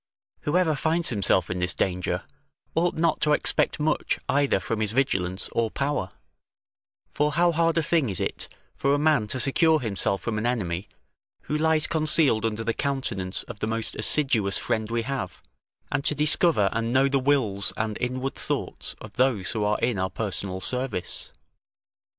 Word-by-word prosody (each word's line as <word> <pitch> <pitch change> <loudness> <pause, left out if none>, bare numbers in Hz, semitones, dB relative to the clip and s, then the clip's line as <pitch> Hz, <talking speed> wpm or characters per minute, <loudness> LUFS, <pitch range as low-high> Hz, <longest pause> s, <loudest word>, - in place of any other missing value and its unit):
Whoever 160 +1 +1
finds 160 +4 0
himself 100 -5 +1
in 90 - -2
this 90 +1 +1
danger, 90 0 -1 0.5
ought 175 +2 +1
not 160 0 +1
to 150 - +3
expect - - +1
much 150 +1 0
either 140 -7 +2
from 110 +3 -3
his 105 0 +1
vigilance 95 -8 0
or 115 -1 0
power; 140 -6 -2 1.0
for 150 0 0
how 170 +2 +3
hard 165 0 +1
a 165 - +2
thing 155 -6 +1
is 95 - +5
it - - -3 0.3
for 140 +1 +1
a - - +1
man 150 -7 +2
to 130 - -3
secure 155 +5 +3
himself 100 -5 0
from 110 -2 -2
an 110 - -3
enemy, 95 -6 -2 0.5
who 150 - -3
lies 160 0 +2
concealed 155 -8 +2
under 110 0 -4
the 115 +1 -1
countenance 120 -10 -2
of 110 -3 -10
the - - -2
most 115 0 -2
assiduous 110 -5 +2
friend 110 -1 -1
we 115 0 -1
have, 130 -9 -4 0.5
and 140 - 0
to 150 - +3
discover 150 - +3
and 115 0 -2
know 130 +2 +4
the 140 0 +1
wills 125 -8 +1
and 110 -1 -2
inward 130 +2 -2
thoughts - - -4
of - - -11
those 125 -7 +2
who 110 -2 -2
are 105 +1 +1
in 115 -4 0
our 95 0 0
personal 95 -1 -3
service. 120 -3 -1
120 Hz, 175 wpm, -25 LUFS, 105-150 Hz, 1.0 s, is